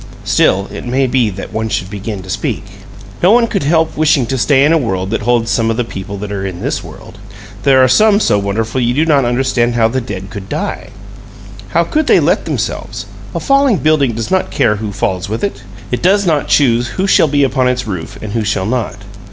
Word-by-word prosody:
Still, 100 +2 +2
it - - -7
may 130 +2 0
be 125 -3 +1
that 95 0 -8
one 110 0 -2
should 100 -2 -3
begin 100 -1 -5
to 95 - -12
speak. 100 - -2 0.6
No 180 - +5
one 235 +2 +5
could 200 -4 -2
help 160 +2 +1
wishing 150 -4 +2
to 130 - -2
stay 140 +2 +4
in 155 - +3
a - - +4
world 95 -6 -2
that 115 - -1
holds 120 0 +1
some 115 -1 +1
of 115 - -1
the 125 - +1
people 100 -2 -7
that 100 +1 -6
are 100 -1 -3
in 95 -3 -5
this - - -3
world. - - -12 0.4
There 130 0 +5
are - - +5
some 210 - +4
so 105 - +2
wonderful 110 +5 -2
you 120 0 +1
do 155 +3 +2
not 145 -5 +3
understand 120 -1 +1
how 115 -1 +3
the 130 +2 -1
dead 100 -4 -7
COULD 100 -2 -8
die. 90 +3 -4 0.8
How 170 - +2
could 305 - -1
they - - +5
let - - +1
themselves? - - -4 0.3
A - - 0
falling 275 -5 +3
building 150 -6 +2
does 115 +9 -4
not 185 0 +1
care 105 - +1
who 105 0 -4
falls 95 -1 -2
with 110 - -4
it. 200 - -3 0.3
It 125 - -1
does 200 +3 +3
not 155 -5 +1
choose 120 -4 +3
who 190 - +1
shall 190 - +4
be 145 0 +2
upon 130 -1 +1
its 125 0 -1
roof 90 -7 -6
and 105 - -5
who 115 - 0
shall 105 -3 -1
not. 115 -1 -2
120 Hz, 230 wpm, -15 LUFS, 105-145 Hz, 0.8 s, No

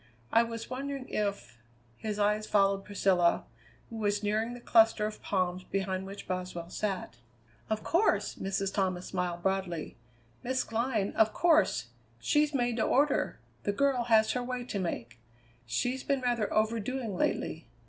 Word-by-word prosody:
I 230 - +7
was 230 -1 -4
wondering 270 +1 -4
if 200 - -3 0.2
" 120 0 -33
His 215 -2 -3
eyes 210 +1 +1
followed 195 -1 +3
Priscilla, 190 -4 +2 0.5
who 225 - -6
was 205 -1 0
nearing 220 +3 0
the - - -9
cluster 225 -2 +4
of 215 0 -5
palms 185 -2 -1
behind 190 0 -2
which 200 +1 -9
Boswell 180 -2 -4
sat. 190 - -3 0.5
"Of 215 0 -1
course!" 365 +6 +2
Mrs. 195 0 -2
Thomas 185 -3 0
smiled 180 -2 -3
broadly; 190 -4 -2 0.4
"Miss 255 +1 0
Glynn, 225 -3 -1
of 220 0 +3
course! 315 - +3 0.3
She's 295 - +2
made 245 -4 0
to 220 - +2
order. 285 +6 +2 0.2
The 205 - -1
girl 265 0 +2
has 220 -2 +4
her 250 - -1
way 250 0 -3
to 225 -5 -4
make. 120 -10 -4 0.5
She's 245 - -1
been 275 -2 0
rather 240 -4 0
overdoing 225 +1 0
lately. 160 -4 -1
210 Hz, 155 wpm, -30 LUFS, 190-240 Hz, 0.5 s, I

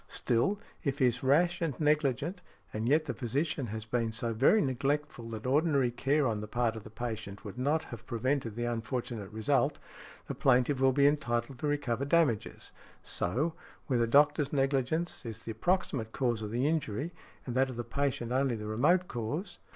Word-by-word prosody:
Still, 125 - 0 0.2
if 140 -3 -1
he 130 - +3
is 125 0 +1
rash 170 +7 +3
and 160 -6 -2
negligent, 150 +3 +1 0.3
and 110 +3 -1
yet 155 +2 +3
the 130 - -2
|69| - - -17
physician 140 - -1
has 110 +1 -5
been 115 0 -1
so 115 +1 -2
very 135 - +5
neglectful 135 - -1
that 110 0 -6
ordinary 140 -2 +2
care 140 +4 +1
on 110 -4 0
the 105 - -6
part 120 0 0
of 110 - -6
the - - -11
patient 110 -3 -6
would 105 +4 -7
not 150 +5 +1
have 120 -5 -10
prevented 120 -1 -1
the 120 +1 -2
unfortunate 115 -2 -3
result, 135 +6 +1 0.5
the - - -4
plaintiff 130 +1 +3
will 135 0 +5
be 140 +2 +3
entitled 120 -3 +1
to 150 - -1
recover 140 -4 0
damages. 140 -8 +1 0.3
So, 130 - -1 0.3
where 125 -4 +1
the 115 - +2
doctor's 145 +2 +4
negligence 140 +4 0
is 115 -2 -7
the 115 - -5
proximate 130 - -1
cause 120 -4 0
of 105 - -4
the 120 +5 0
injury, 155 0 -1 0.3
and 125 - -4
that 130 +1 +2
of 130 - -6
the 120 - -3
patient 120 -1 -2
only 130 -1 +2
the 105 -1 -6
remote 150 +13 +2
cause. 145 - -4
130 Hz, 190 wpm, -31 LUFS, 115-145 Hz, 0.5 s, very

